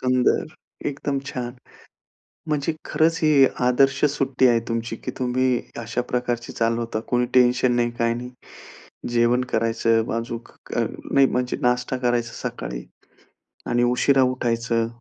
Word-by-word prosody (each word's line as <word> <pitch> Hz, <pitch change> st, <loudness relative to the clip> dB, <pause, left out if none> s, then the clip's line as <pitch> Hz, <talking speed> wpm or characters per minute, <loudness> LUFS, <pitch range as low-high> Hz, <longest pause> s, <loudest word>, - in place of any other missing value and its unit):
सुंदर! 125 Hz, -1 st, +2 dB, 0.4 s
एकदम 140 Hz, 0 st, -2 dB
छान! 120 Hz, -1 st, -4 dB, 0.9 s
म्हणजे 150 Hz, +1 st, 0 dB
खरंच 165 Hz, +1 st, +2 dB
ही 150 Hz, -3 st, +6 dB, 0.2 s
आदर्श 135 Hz, +2 st, +3 dB
सुट्टी 130 Hz, -2 st, +2 dB
आहे 120 Hz, -1 st, +4 dB
तुमची 115 Hz, 0 st, -2 dB
की -, -, -6 dB
तुम्ही 130 Hz, 0 st, +1 dB, 0.3 s
अशा 115 Hz, +2 st, -2 dB
प्रकारची 120 Hz, -1 st, -2 dB
चालवता, 115 Hz, -1 st, -1 dB
कोणी 125 Hz, 0 st, +1 dB
टेन्शन 125 Hz, 0 st, +4 dB
नाही, 120 Hz, 0 st, +1 dB
काही 115 Hz, 0 st, +2 dB
नाही. 125 Hz, +1 st, -6 dB, 0.8 s
जेवण 120 Hz, +1 st, +3 dB
करायचं 115 Hz, 0 st, +1 dB
अजुक 115 Hz, 0 st, -6 dB, 0.3 s
अ, -, -, +3 dB, 0.3 s
नाही 135 Hz, -1 st, +6 dB
म्हणजे 125 Hz, 0 st, -1 dB
नाश्ता 125 Hz, 0 st, +1 dB
करायचा 120 Hz, -1 st, 0 dB, 0.2 s
सकाळी -, -, -6 dB, 0.9 s
आणि 120 Hz, 0 st, +2 dB
उशिरा 135 Hz, +2 st, +4 dB
उठायचं 115 Hz, -2 st, 0 dB
125 Hz, 130 wpm, -23 LUFS, 115-130 Hz, 0.9 s, ही